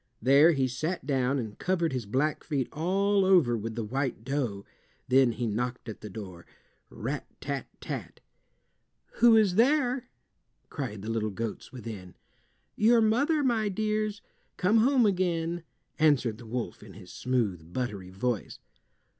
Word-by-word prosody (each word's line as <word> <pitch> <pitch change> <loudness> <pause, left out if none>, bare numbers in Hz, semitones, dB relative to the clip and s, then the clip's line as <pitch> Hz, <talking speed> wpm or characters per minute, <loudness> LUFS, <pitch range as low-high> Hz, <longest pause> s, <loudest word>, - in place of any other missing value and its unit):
There 140 +7 +6
he 135 -3 +1
sat 155 +7 -3
down 135 -1 +1
and 110 -5 -5
covered 170 -5 0
his 125 -5 -3
black 140 +7 0
feet 140 -5 -1
all 195 +5 +2
over 180 -11 +4
with 115 0 -4
the 115 - -2
white 130 +1 -2
dough. 125 -7 -2 0.4
Then 130 -2 +4
he 120 - -3
knocked 120 +3 -3
at 110 - -7
the 105 - -7
door—rat 95 -4 -8
tat - - -4
tat! - - -6 1.0
"Who 235 -1 +7
is 210 -4 +4
there?" 250 +2 +2 0.6
cried 110 -9 -5
the 110 - -3
little 110 -1 -1
goats 110 +2 -5
within. 110 -7 -8 0.6
"Your 230 +2 +5
mother, 280 +8 +2
my 225 -5 +1
dears, 215 0 -1 0.3
come 205 +5 +3
home 250 +1 +4
again," 175 -3 0 0.4
answered 130 -8 +3
the 115 - -11
wolf, 120 +1 -4
in 105 -2 -12
his 90 -2 -12
smooth 105 -10 -1
buttery 105 -6 -4
voice. 105 +3 -3
135 Hz, 145 wpm, -28 LUFS, -, 1.0 s, Who